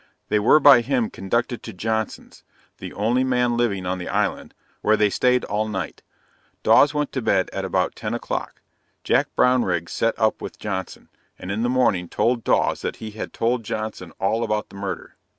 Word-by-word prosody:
They 105 - +2
were 115 +8 +5
by 140 -4 +8
him 125 -2 0
conducted 120 +5 -2
to - - -8
Johnson's 110 +3 -4 0.4
(the - - -7
only 120 +5 +1
man 125 -2 +1
living 105 -6 0
on 90 +1 -2
the 90 - -6
island,) - - -1 0.3
where 110 +1 +3
they 105 -1 +3
staid 125 +3 +2
all 105 +1 -1
night 105 -3 -5 0.6
Dawes 145 - +6
went 150 -1 -2
to 130 - -3
bed 95 -4 +1
at - - -3
about - - 0
10 - - -3
o'clock - - -4 0.4
Jack - - +2
Brownrigg 95 -10 +2
set 115 0 0
up 110 -1 +1
with - - -7
Johnson, 95 -3 -5 0.3
and 90 - -6
in 105 +3 -2
the 120 - +1
morning 115 -9 +1
told 120 0 0
Dawes - - +1
that - - -3
he 110 -1 -8
had 105 - -6
told 120 +1 0
Johnson 110 -5 -5
all 110 +4 +1
about 105 -1 -2
the - - -14
murder. 100 -1 -6
110 Hz, 185 wpm, -23 LUFS, 100-125 Hz, 0.6 s, by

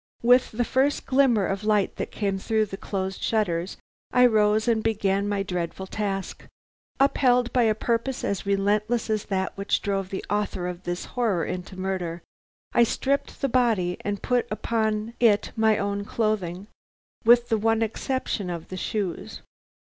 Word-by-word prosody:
"With 245 +1 +4
the 240 +2 0
first 270 +4 +1
glimmer 260 -7 +3
of 195 +2 -2
light 210 -2 +1
that - - -3
came 200 -2 -2
through 220 +2 +1
the 195 - -7
closed 190 -1 -4
shutters 185 -5 -1 0.3
I 250 0 +5
rose 215 -1 +3
and 225 -2 +2
began 200 -2 0
my 200 -1 0
dreadful 180 0 -4
task. 195 -1 -4 0.5
Upheld 250 -3 +3
by 245 -2 +4
a 215 - +1
purpose 235 +3 -1
as 200 - -1
relentless 210 +4 0
as 215 -1 -1
that 190 -1 -2
which 200 0 0
drove 195 -2 -2
the 190 - -5
author 205 -3 -1
of 180 0 -6
this 175 0 -3
horror 220 -9 +1
into 180 +1 -6
murder, 180 -3 -3 0.5
I - - +4
stripped 275 +4 -1
the 275 - +2
body 225 -9 +1
and 205 0 -3
put 250 -1 +1
upon 220 0 -1
it 220 -4 +3
my 220 -1 +3
own 200 0 -2
clothing, 200 -4 -2 0.6
with 240 +1 +5
the 225 - +2
one 225 +1 +2
exception 225 -3 -2
of 170 -2 -6
the 185 - -6
shoes. 195 -1 -4
210 Hz, 165 wpm, -25 LUFS, 195-230 Hz, 0.6 s, I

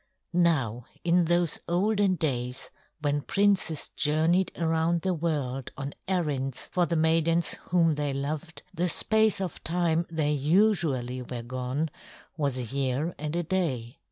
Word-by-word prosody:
II 175 - +3
Now 125 -9 +1 0.2
in 175 0 +3
those 175 -1 +1
olden 200 +2 +2
days, 125 -6 -3 0.3
when 145 -1 +1
princes 195 -4 +1
journeyed 160 +5 +2
around 165 0 +1
the 190 -1 +1
world 145 -6 -2
on 140 0 -4
errands 145 -8 -1
for 175 -1 +2
the 170 - 0
maidens 165 +1 +2
whom 165 -2 +3
they 145 -1 -1
loved, 150 +4 -4
the 180 0 0
space 220 +2 +3
of 185 -3 -4
time 170 0 +1
they 155 -3 0
usually 150 - +2
were 125 -1 -6
gone 130 +5 -3 0.4
was 140 -5 -1
a 125 - -2
year 135 +6 -1
and 150 +2 -3
a 175 - 0
day. 145 -9 -2
160 Hz, 145 wpm, -28 LUFS, 140-175 Hz, 0.4 s, II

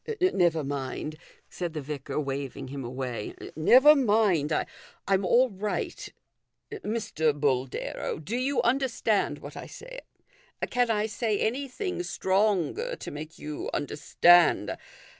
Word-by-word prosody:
" - - -40
Never 175 - +2
mind," 140 +2 -4 0.3
said 175 -3 -5
the 155 - -3
vicar, 140 0 -4
waving 135 -2 -4
him 140 0 -5
away. 125 -2 -5
" - - -11
Never 260 - +7
mind; 205 - +2 0.6
I'm 195 0 +2
all 245 +6 +4
right. 205 +2 -4 0.6
Mr. 205 - -1
Boldero, 130 -3 -1
do 160 +9 -5
you 265 +3 0
understand 235 -4 +1
what - - -10
I - - -7
say? - - -10 0.7
Can 245 -1 +2
I 215 -1 +1
say 220 -1 -1
anything 275 - -2
stronger 195 - 0
to - - -8
make 155 +2 -8
you 150 0 -5
under 145 - -3
stand 175 +3 +4
185 Hz, 130 wpm, -27 LUFS, 150-240 Hz, 0.7 s, Never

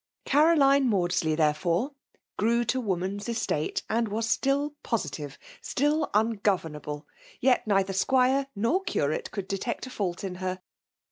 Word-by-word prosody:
Caroline 280 -3 +4
Maadsley^ 175 -5 +1
therefore, 165 - +1 0.4
grew 235 +2 +2
to 255 +3 0
wo 200 -6 0
man 185 +3 -3
s 205 - -8
estate^ 225 -10 -1
and 230 +1 +1
was 220 +2 -2
still 280 +5 +1
positive, 150 -10 -3 0.2
still 295 +2 0
ungo 220 0 +2 0.2
venu^ble; 150 -1 -7 0.4
jet 250 -3 +3
neither 195 -2 +2
squire 260 +6 +2
nor 235 - +1
curate 465 +4 -1
could 195 -2 -5
detect 200 +7 -3
a 255 - -9
&uU 180 -3 0
in 190 -2 -4
her. 185 0 -2
220 Hz, 145 wpm, -27 LUFS, 185-265 Hz, 0.4 s, Caroline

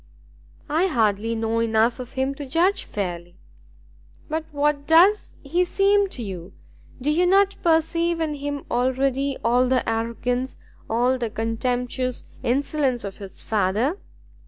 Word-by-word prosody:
"I 325 +5 +2
hardly 225 - +1
know 225 0 -1
enough 230 +1 +2
of 250 -1 -8
him 265 +1 -1
to 280 0 -8
judge 350 +8 +1
fairly." 175 -3 -5 0.9
"But 315 +1 -3
what 290 0 0
does 365 +6 +4
he 340 +6 +1
seem 395 +2 +2
to 250 - -5
you? 185 -2 -7 0.5
Do 280 +4 0
you 350 +4 +3
not 395 +1 +4
perceive 335 +1 +2
in 315 -2 -1
him 285 0 -5
already 260 +2 0
all 245 +2 +3
the 255 -1 +1
arrogance, 235 +3 -2 0.3
all 245 +3 +2
the 235 -2 -2
contemptuous 245 +3 -2 0.2
insolence 270 0 0
of 200 -1 -6
his 195 -2 -10
father?" 220 - 0
260 Hz, 135 wpm, -23 LUFS, 230-310 Hz, 0.9 s, does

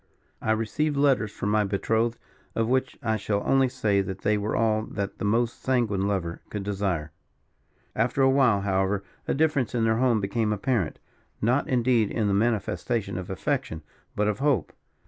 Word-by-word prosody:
I - - -3
received 140 +7 -1
letters 135 -7 +3
from 105 - -3
my 105 0 +3
betrothed, 110 +4 0 0.4
of 115 0 +1
which 130 +1 0
I 110 -2 +1
shall 100 0 -1
only 135 -1 +3
say 110 -6 +1
that 95 0 -5
they 105 +1 +2
were 105 +1 -1
all 110 -1 +2
that 100 -1 -4
the - - -2
most 115 +3 0
sanguine 110 -7 +1
lover 90 -4 -2
could 105 -2 -4
desire. 95 -6 -2 0.8
"After 120 +4 +1
a 135 - +6
while, 125 -7 +4
however, 95 0 0 0.2
a - - +1
difference 140 -5 +1
in 115 - +1
their 110 0 +2
tone 125 -3 +3
became 105 +2 0
apparent. 105 -4 0 0.4
Not, 125 +8 +1
indeed, 120 -4 +2
in 110 -3 0
the 100 - +1
manifestation 110 -1 0
of 90 -1 -5
affection, 95 - -2 0.3
but 105 0 +1
of 105 -1 -1
hope. 135 - +1
110 Hz, 175 wpm, -26 LUFS, 100-125 Hz, 0.8 s, a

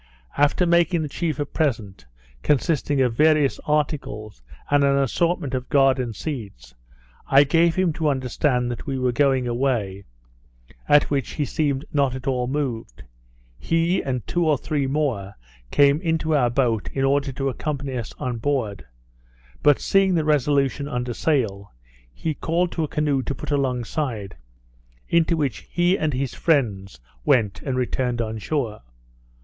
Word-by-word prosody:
After 145 +5 +3
making 170 -1 +3
the - - -3
chief 155 0 -2
a 145 - 0
present, 115 - -2 0.3
consisting 145 - +1
of 125 -3 +2
various 150 +1 +3
articles, 140 - -2 0.3
and 145 -1 +4
an 140 0 +3
assortment 140 +1 0
of 125 -1 -3
garden 135 -3 +3
seeds, 100 - -7 0.5
I 135 +1 +6
gave 165 +3 +3
him 185 -3 +1
to 155 -1 0
understand 125 -1 0
that 120 - -7
we 135 -1 -2
were 130 -1 +1
going 130 -1 +2
away, 120 -6 -1 0.8
at 145 0 +5
which 135 -4 -1
he 150 - -1
seemed 140 -1 -1
not 140 -3 +1
at 130 0 -8
all 125 -3 0
moved. 125 - -4 0.6
He, 165 - +1
and 125 -4 -3
two 175 - 0
or 150 - +3
three 145 -1 -2
more, 130 -9 -2 0.3
came 145 - +4
into 160 -2 0
our 125 -4 +3
boat, 115 -8 0
in 135 0 0
order 140 0 +1
to 135 +1 -1
accompany 140 0 -4
us 115 -4 -4
on 125 -2 -3
board; 110 - -2 0.7
but 145 -2 +4
seeing 195 -2 +3
the 160 -2 +1
Resolution 140 -1 +1
under 125 -2 -3
sail, 110 -10 -1 0.4
he 155 - -3
called 170 +4 -1
to 165 - -2
a - - -1
canoe 145 -2 0
to 140 - -4
put 150 - -6
alongside, 125 -5 -2 0.7
into 170 0 +2
which 140 -7 -1
he 175 +1 +2
and 155 -5 -1
his 130 -1 -2
friends 105 - 0 0.2
went, 105 - +2
and 130 -3 -3
returned 125 -1 -1
on 110 -1 -3
shore. 120 -4 -2
140 Hz, 155 wpm, -23 LUFS, 120-150 Hz, 0.8 s, I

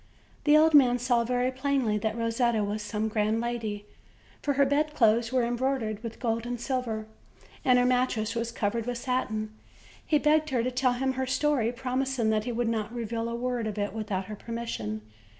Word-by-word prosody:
The 295 0 +7
old 315 +1 +5
man 255 -4 +6
saw 245 -1 +2
very 250 +2 0
plainly 260 -5 0
that 220 +2 -2
Rosetta 230 -1 +1
was 205 +1 -2
some 210 +1 -2
grand 215 +1 +1
lady, 225 -3 -3 0.6
for 285 - 0
her 280 +1 +4
bedclothes 265 -6 +2
were 255 -1 +2
embroidered 240 -3 -1
with 230 -1 -7
gold 230 -1 -1
and 245 -1 -3
silver, 240 -4 -2 0.6
and 250 -1 +5
her 245 - +4
mattress 250 -3 +1
was 235 0 -2
covered 230 +1 -2
with 245 -1 -2
satin. 225 -4 -2 0.5
He 305 - +2
begged 305 +1 +3
her 250 -4 +1
to 255 - -1
tell 255 0 +2
him 265 +2 0
her 260 0 -2
story, 260 -3 +1
promising 255 -2 -1
that 215 -1 0
he 245 - -2
would 240 0 -1
not 220 -1 -1
reveal 230 -1 -3
a 235 - -3
word 245 -1 -2
of 215 -1 -4
it 205 -1 -2
without 210 -4 -3
her 210 +2 -6
permission. 210 - -4
235 Hz, 190 wpm, -28 LUFS, 220-255 Hz, 0.6 s, The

